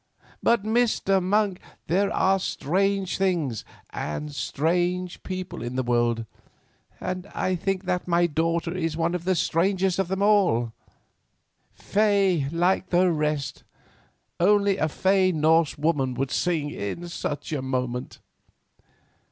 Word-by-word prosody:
But, 235 -4 +3
Mr. 215 -4 +2
Monk, 195 0 +1 0.3
there 195 +4 +1
are 195 +1 +2
strange 190 +4 0
things 165 - 0 0.3
and 150 - -4
strange 175 +5 -1
people 185 -7 -5
in 120 +1 -5
this 130 -1 -1
world, 120 -1 +1 0.7
and 185 +1 -4
I 185 - 0
think 190 +2 -2
that 180 -1 -1
my 175 0 +3
daughter 165 +1 0
Stella 180 -1 -3
is 165 -1 -1
one 170 +1 0
of 175 -1 -3
the 185 0 +2
strangest 185 +3 +1
of 195 - +1
them. 190 - +2 1.0
Fey 195 -7 +1
like 180 +2 +1
the 180 0 +3
rest—only 170 +6 -1
a 155 - 0
fey 190 +3 +2
Norse 160 0 +2
woman 145 -4 0
would 130 +1 -2
sing 160 -5 0
in 135 - -5
such 155 -2 -4
a 145 - -1
moment." 125 -1 -3
175 Hz, 125 wpm, -25 LUFS, 150-190 Hz, 1.0 s, But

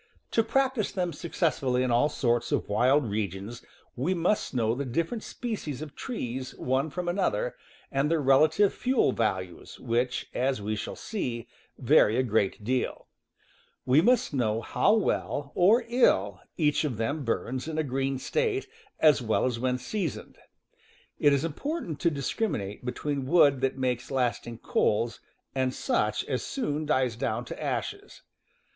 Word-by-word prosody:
To 225 - +4
prac 265 +3 +2
tice 220 -6 -2
them 180 -3 -2
successfully 140 -6 0
in 130 - 0
all 120 +6 +3
sorts 120 -4 0
of - - 0
wild 130 +7 +3
regions 105 +2 -4 0.3
we. 155 +10 0
must 180 +5 0
know 115 -3 +1
the 135 +4 -2
different 165 - -2
species 210 - -5
of 150 -2 -9
trees 130 - -4
_,. - - -19
one 130 +4 0
from 180 +3 -4
another, 205 - 0 0.4
and 135 +2 +1
their 165 -1 +2
relative 155 +8 +4
fuel 255 0 +2
values, 95 -6 -3
which, 120 +2 -1
as 130 -1 0
we 105 +1 -2
shall 105 - -5
see, 120 - -4 0.3
vary 125 -4 +4
a 130 - +3
great 105 -3 0
deal. 125 +3 -2 0.8
We 130 +4 +5
must 245 -3 +3
know 115 -4 0
how 200 - +2
well, 145 -9 -1
or 220 +7 +4
ill, 100 - +2 0.2
each 150 -1 +2
of 135 -8 -2
them 140 +7 -1
burns 125 +3 -2
in 160 -1 -4
a 155 - +2
green 135 0 -1
state, 425 - -1 0.3
as 150 -5 +5
well 110 0 +1
as 125 -2 -1
when 125 +1 0
seasoned. 180 - -4 0.8
It 145 - +5
is 140 +2 +2
important 170 - -4
to 170 - +3
discriminate 140 - -3
between 135 +2 -3
wood 140 -4 +5
that 135 0 0
makes 125 -1 -1
lasting 120 -3 -1
coals 115 +2 +1 0.3
and 130 -1 0
such 255 - 0
as - - -2
soon 155 - -2
dies 130 -6 +1
down 120 -1 -2
to - - -7
ashes. - - -4
135 Hz, 160 wpm, -28 LUFS, 120-170 Hz, 0.8 s, We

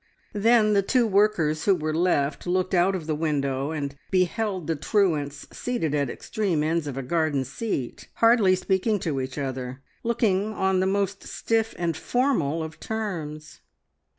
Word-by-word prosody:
Then 215 0 +4
the 200 - +4
two 240 +5 +2
workers 195 -7 +2
who 195 - +5
were 155 -2 -2
left 155 -3 +1
looked 185 +1 0
out 185 +2 +3
of 170 -4 -5
the 155 - -1
window 140 -3 -1
and 145 -3 -3 0.2
beheld 185 0 0
the 165 - -1
truants 150 -4 0
seated 235 - -2
at 140 -3 0
extreme 190 - -1
ends 160 0 0
of 135 -2 -5
a 135 - -3
garden 155 -1 0
seat, 135 - -4
hardly 230 -5 +5
speaking 190 +3 +1
to 145 -6 -1
each 130 +1 -6
other, 130 -1 -4 0.2
looking 215 -3 +1
on 190 -2 +1
the 190 - +2
most 200 0 0
stiff 225 -1 -1
and 170 -2 -1
formal 170 - 0
of 160 0 -8
terms. 165 -9 -5
175 Hz, 160 wpm, -25 LUFS, 150-205 Hz, 0.2 s, who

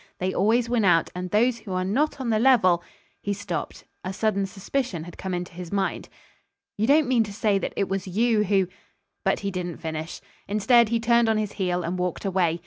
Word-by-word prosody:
They 185 +1 -1
always 225 +5 +2
win 235 -2 +1
out; 175 -4 +3
and 180 0 -5
those 235 +4 +2
who 210 -4 -7
are 185 0 0
not 275 +11 0
on 250 -3 -1
the 215 - +2
level 210 -9 +4 0.2
" - - -38
He 200 - -1
stopped. 205 +1 -5 0.2
A 185 - -3
sudden 200 -1 0
suspicion 195 - -3
had 175 +1 -10
come 190 - -5
into 175 0 -5
his 175 0 -8
mind. 195 -1 -2 0.7
"You 215 +2 0
don't 295 +1 +4
mean 245 -3 +3
to 210 - -7
say 205 -1 +1
that - - -4
it 200 - +1
was 195 0 -3
you 215 +3 +2
who 195 -2 +2 0.3
" - - -51
But - - +1
he 200 0 -2
didn't 180 -2 -4
finish. 160 +1 -5 0.3
Instead, 215 +3 +4
he 230 0 +1
turned 235 0 +3
on 220 - +2
his 210 -1 -1
heel 180 -2 -1
and 180 +2 -3
walked 180 +2 -2
away. 180 -3 +1
200 Hz, 225 wpm, -25 LUFS, 180-225 Hz, 0.7 s, level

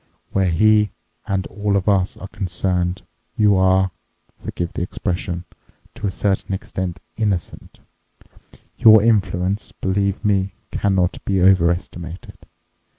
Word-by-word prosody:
Where 95 -2 +2
he 105 +4 +4 0.4
and 95 -2 -1
all 100 0 -2
of 95 - -3
us 95 -2 +2
are 95 - -8
concerned 90 -2 -2 0.3
you 105 -2 +4
are—forgive 95 -2 -1
the - - -4
expression—to 90 +2 -5
a - - +1
certain 95 0 -1
extent 90 -2 -5 0.2
innocent. 105 -5 -3 1.0
Your 110 -3 +8
influence, 100 -2 +1
believe 100 +2 -1
me, 100 -2 +1 0.2
cannot 95 -3 0
be 95 -2 0
overestimated. 85 -2 +1
95 Hz, 105 wpm, -21 LUFS, 90-100 Hz, 1.0 s, Your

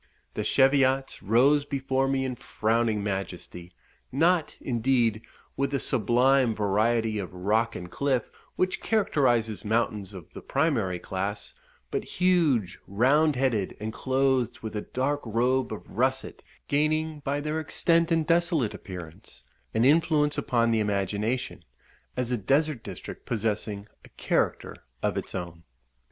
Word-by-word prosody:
The - - -2
Cheviots 135 0 +3
rose 135 +8 +4
before 135 -1 -1
me 135 0 0
in 130 -1 -3
frowning 110 -2 0
majesty; 90 -3 -5 0.4
not, 165 +4 +2
indeed, 120 -3 +1 0.3
with 140 0 0
the 140 0 -1
sublime 125 +1 +3
variety 110 +2 +1
of 95 - -5
rock 105 +5 0
and 90 - -6
cliff 135 -4 -1 0.2
which 185 0 0
characterizes 125 - +1
mountains 105 -3 -1
of 90 -4 -11
the - - -8
primary 130 - 0
class 100 +3 -4 0.4
but - - -1
huge, 160 - +1
round 140 +9 +3
headed, 120 -7 0
and 110 +1 -4
clothed 130 -1 0
with 110 -1 -6
a 105 - -1
dark 140 +6 -2
robe 125 +3 +1
of 110 - -7
russet, 130 +4 -1 0.3
gaining, 155 +1 0
by 145 0 -2
their 150 +2 -2
extent 165 +2 +2
and 165 -1 +2
desolate 165 - +2
appearance, 90 - -10 0.3
an 115 +2 +3
influence 150 0 +3
upon 115 -3 +1
the 115 - +2
imagination, 105 +4 -1 0.5
as 125 -1 -1
a 125 - +1
desert 140 +5 +1
district - - -9
possessing 105 -2 -2 0.2
a - - -15
character - - 0 0.3
of - - +1
its - - -4
own. 85 -2 -6
125 Hz, 135 wpm, -27 LUFS, 105-140 Hz, 0.5 s, rose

